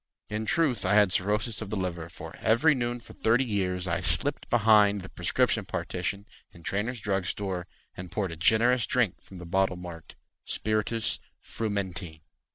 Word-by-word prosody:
In 110 +1 -3
truth 145 - +2
I 105 - +2
had 105 -3 +5
cirrhosis 105 +4 +1
of 110 - -5
the 110 - -3
liver, 85 -3 -3
For - - -10
every 120 +8 +4
noon 120 -2 -2
for - - -13
thirty 120 +4 +2
years, 95 -5 -1
I 85 - -1
slipped - - +2
behind 105 -3 +5
the 95 - -9
prescription - - +1
partition 100 +3 -4 0.3
In 85 - -16
Trainor's 110 +7 -2
drug 95 -3 -1
store 95 -3 -3 0.3
And 90 0 -8
poured 95 -2 -2
a - - -5
generous 115 +7 +3
drink 120 -8 +1
From 95 - -13
the 90 - -9
bottle 95 +2 +1
marked 85 -2 -9 0.3
"Spiritus 110 +1 0 0.2
frumenti." 95 -7 -4
100 Hz, 165 wpm, -28 LUFS, 90-110 Hz, 0.3 s, had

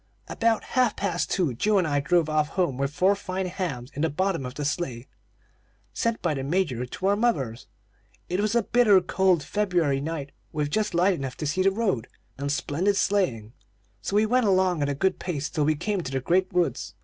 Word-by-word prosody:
"About 230 -1 +1
half 250 -4 +1
past 175 -4 -1
two, 170 -9 0
Joe 205 - +1
and 185 - +2
I 145 -1 +1
drove 165 +3 +2
off 155 -1 +1
home 175 -5 -1
with 135 +1 -1
four 185 +6 +3
fine 190 -1 -4
hams 155 -9 -4
in 145 - -4
the 160 - +2
bottom 170 -3 -1
of 125 - -9
the 145 - -3
sleigh, 135 -5 -3 0.9
sent 230 -1 -1
by 175 -4 +1
the 135 -2 -3
Major 140 -6 -1
to 185 +9 -6
our 200 +1 +4
mothers. 140 - -1 0.6
It 180 +2 -1
was 215 +2 0
a 235 - +3
bitter 215 -4 +5
cold 180 -2 +2
February 170 -7 0
night, 145 -2 -4 0.2
with 150 -1 -2
just 210 -1 0
light 180 +3 +4
enough 135 -6 -5
to 155 - -4
see 150 +6 0
the 190 - +5
road, 195 - -1 0.3
and 140 0 -2
splendid 175 +7 0
sleighing; 125 - 0 0.5
so 200 - -3
we 210 +1 +4
went 245 +1 +2
along 185 -4 +2
at 145 - +1
a 140 - -1
good 190 +6 0
pace, 150 -5 -3
till 150 -3 0
we 155 +1 +2
came 195 +5 -2
to 135 - -6
the 135 - 0
great 180 +9 +1
woods. 180 -2 -1
175 Hz, 210 wpm, -26 LUFS, 145-195 Hz, 0.9 s, bitter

